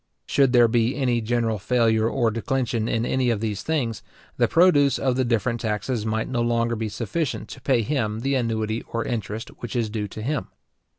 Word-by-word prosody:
Should 135 - +3
there 120 -2 +6
be 115 +2 +1
any 125 -4 +1
general 115 -1 0
failure 115 0 +2
or 120 -3 +1
declension 115 -1 -1
in 115 +1 0
any 130 -1 +1
of 115 -3 +1
these 105 -2 -2
things, 125 - -1 0.3
the - - +3
produce 145 -6 +4
of 130 -2 0
the 130 - +2
different 120 0 0
taxes 110 +1 -2
might 110 0 -1
no 120 -2 -1
longer 115 0 +1
be 110 -1 -3
sufficient 130 +8 -3
to 130 - -9
pay 125 -3 +2
him 110 -4 -1
the 135 +2 0
annuity 115 -3 -1
or 115 0 -2
interest 110 -1 -4
which 120 - -6
is 115 -3 0
due 105 -2 -2
to 110 +2 -8
him. 145 +4 -2
115 Hz, 195 wpm, -24 LUFS, 110-130 Hz, 0.3 s, there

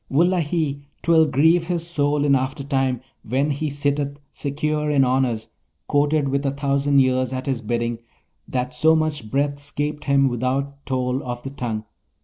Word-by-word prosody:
Wullahy, 160 -2 +1 0.2
'twill 165 -2 +5
grieve 160 +5 +3
his 170 -1 -2
soul 145 -3 +1
in 140 - +4
aftertime 135 -1 0 0.2
when 135 +6 0
he 150 +2 -2
sitteth 145 0 -1
secure 150 +1 -2
in 140 -3 +4
honours, 125 -3 0 0.4
courted, 145 0 +2
with 140 +1 0
a 140 - +1
thousand 140 0 +2
ears 130 -1 +2
at 130 0 -4
his 135 -4 -1
bidding, 115 +1 -2 0.5
that 125 0 -2
so 160 +6 +4
much 155 -8 -1
breath 140 +2 0
'scaped 150 +1 -3
him 140 -1 +4
without 135 +3 -2
toll 130 0 0
of 120 -1 -5
the 135 - -5
tongue! 115 -5 -3
140 Hz, 155 wpm, -22 LUFS, 130-150 Hz, 0.5 s, twill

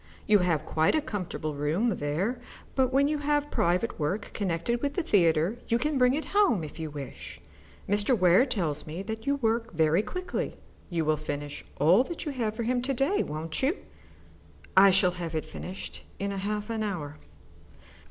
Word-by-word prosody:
You 210 -1 +5
have 170 -4 +1
quite 160 - +2
a - - +4
comfortable 185 - -4
room 165 +10 0
there, 175 - -1 0.3
but 260 -1 +2
when 275 +1 +4
you 300 0 0
have 295 0 0
private 180 +7 +1
work 180 +8 -2
connected 200 +5 -1
with 285 -1 -1
the 360 - 0
theatre 175 - +2
you 230 - +2
can 285 +3 0
bring 250 +1 +4
it 310 - -3
home 390 - +4
if 155 - -8
you 160 -1 -3
wish. 145 -3 -8 0.5
Mr. 205 +5 +2
Ware 185 +7 +5
tells 165 - -2
me 165 +5 -5
that 220 +2 -6
you 280 - +3
work 230 -3 0
very 160 +2 +3
quickly. 365 +11 -4 0.3
You 165 -3 -1
will 155 0 +2
finish 145 -1 -5 0.2
all 175 - +6
that 340 +2 -6
you 300 - -2
have 225 -5 -2
for 235 - -2
him 245 +2 +1
to 265 +2 -1
day, 275 +11 +2
won't 155 +2 -4
you?" 285 +9 +2 1.0
"I 195 +1 +8
shall 185 -1 +4
have 165 -1 -4
it 155 - -1
finished 185 +2 -7
in 200 0 -2
half 210 +2 -3
an 225 -1 -2
hour." 160 -8 -4
200 Hz, 185 wpm, -28 LUFS, 160-250 Hz, 1.0 s, I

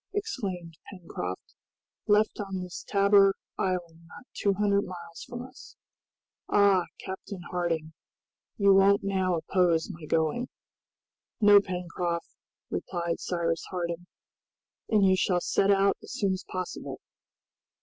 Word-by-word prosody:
exclaimed 185 - -4
Pencroft; 130 - -6 0.5
"left 210 +1 +3
on 195 -2 -3
this 180 -1 -7
Tabor 200 -1 +5 0.2
Island 170 -3 -2
not 215 - -13
two 200 -1 +1
hundred 200 0 +2
miles 180 -3 -8
from 240 0 -5
us! 255 +2 -13 0.7
Ah, 200 -3 +4
Captain 190 0 -7
Harding, 165 -3 -1 0.6
you 200 -1 +5
won't 195 +1 +5
now 190 -2 +1
oppose 170 -1 +1
my 160 -1 -10
going." 160 +12 +1 0.9
"No, 205 -2 +8
Pencroft," 180 -2 -3 0.4
replied 170 -2 -2
Cyrus 165 -2 -1
Harding; 175 -1 -4 0.8
"and 210 -3 +4
you 190 0 +5
shall 185 -1 +2
set 195 +2 +1
out 195 0 +4
as - - -9
soon 200 -7 +1
as 185 - -6
possible." 185 -1 -5
185 Hz, 120 wpm, -28 LUFS, 170-200 Hz, 0.9 s, No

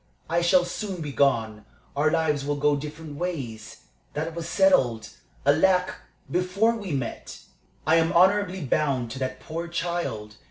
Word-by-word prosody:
I 170 +2 +1
shall 175 +1 +4
soon 190 +1 -5
be 150 -3 -4
gone. 115 -7 +1 0.3
Our 150 +2 +3
lives 155 -3 +1
will 145 +1 -1
go 145 0 +2
different 150 +1 -7
ways. 120 -11 -5 0.3
That 160 +2 -2
was 170 0 -5
settled 125 - +3 0.4
alack! 180 +6 +3 0.4
before 185 +6 +2
we 205 -5 -6
met. 135 -5 -4 0.4
I 160 +2 +4
am 165 0 +2
honorably 190 +1 +3
bound 135 -4 0
to 130 - -6
that 130 -1 -3
poor 165 +3 -5
child. 170 -12 -3
155 Hz, 150 wpm, -25 LUFS, 135-180 Hz, 0.4 s, shall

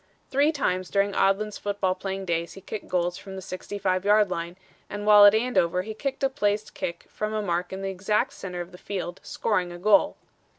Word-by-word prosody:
"Three 285 +3 +4
times 185 - -1
during 200 0 +1
Odlin's 200 +2 +1
football 200 -2 0
playing 195 +1 -5
he 170 0 0
kicked 210 +2 -7
goals 175 -1 -1
from 195 -1 -9
the - - -5
65 185 0 -2
yard 205 -1 +4
line 170 +1 -4 0.3
and 205 0 -5
while 210 -1 +9
at 205 +1 +8
Andover 185 -7 +1
he 220 +2 -6
kicked 275 +5 -4
a - - +5
placed 210 -5 -1
kick 170 0 -5
from 215 0 -4
a 215 - 0
mark 175 -1 -1
in 190 +1 -5
the 195 - -2
exact 210 +6 0
center 180 -2 -6
of 175 +1 -8
the 180 - -13
field, 185 -2 -5
scoring 185 -5 -1
a 175 - -7
goal." 200 +2 +3
195 Hz, 205 wpm, -26 LUFS, 180-210 Hz, 0.3 s, while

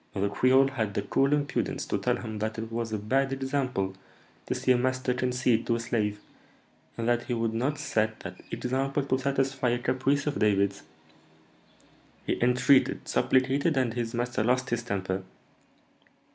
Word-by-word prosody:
The 100 0 0
creole 130 +5 +4
had 110 -7 -3
the - - 0
cool 135 +1 +2
impudence 145 -1 -1
to - - -1
tell - - +1
him 110 -1 -6
that 110 +1 -2
it 110 0 -5
was 115 -1 -3
a 110 - -1
bad 135 +6 0
'example' 130 -8 -1 0.5
to - - -1
see 130 - +1
a - - +6
master 130 0 0
concede 125 -2 +1
to 115 - +2
a - - -2
slave, 110 -3 -1 0.8
and 115 0 -2
that 120 0 +1
he 120 - -1
would 115 -1 -1
not 130 +6 -1
set 110 0 -1
that - - -8
'example' 135 +3 -1
to 130 -1 0
satisfy 135 -1 0
a 120 - +1
caprice 135 +3 0
of 150 - -1
David's! 100 -1 +2 1.4
He - - -1
entreated, 125 +2 +3
supplicated, 135 +4 +2
and 125 -4 +1
his 120 -1 -3
master 120 -2 -1
lost 125 +2 +1
his 120 0 0
temper. 95 -4 -2
125 Hz, 170 wpm, -28 LUFS, 110-135 Hz, 1.4 s, a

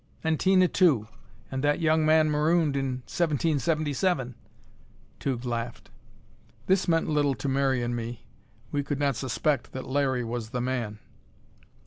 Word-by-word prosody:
"And 160 -1 +1
Tina, 185 -1 +4
too, 150 - +3 0.4
and 130 +1 -3
that 145 +2 +2
young 160 -1 +3
man 155 0 +4
marooned 155 0 +2
in 130 -2 -2
1777!" 155 -2 0 0.9
Tugh 130 -3 -2
laughed. 120 0 -4 0.7
This 190 0 +2
meant 165 -1 +2
little 145 -3 +1
to 105 - -5
Mary 135 -2 +1
and 120 0 -2
me; 120 +1 -6 0.5
we 145 - 0
could 145 0 -3
not 140 -2 +1
suspect 130 +2 -1
that 130 - -5
Larry 130 -2 0
was 115 -1 -4
the 125 +1 -3
man. 120 -4 -2
140 Hz, 140 wpm, -27 LUFS, 125-155 Hz, 0.9 s, Tina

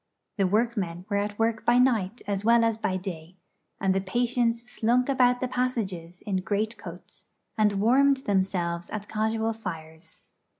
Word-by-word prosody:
The 195 - +3
workmen 200 -5 -1
were 200 - +1
at 205 0 -2
work 225 0 0
by 240 +1 +4
night 235 -4 +2
as 200 -1 -2
well 230 +1 +5
as 225 -1 +2
by 190 -4 -1
day; 180 -2 -7 0.4
and 190 -1 +2
the 195 - 0
patients 235 +3 0
slunk 245 +2 +1
about 250 -2 +3
the 255 - 0
passages 200 -9 -3
in 195 -2 -1
greatcoats, 210 +4 -4 0.3
and 210 -1 +3
warmed 260 +7 +4
themselves 180 -3 0
at 210 -1 -5
casual 220 +1 -1
fires. 160 -6 -9
215 Hz, 155 wpm, -27 LUFS, 190-235 Hz, 0.4 s, well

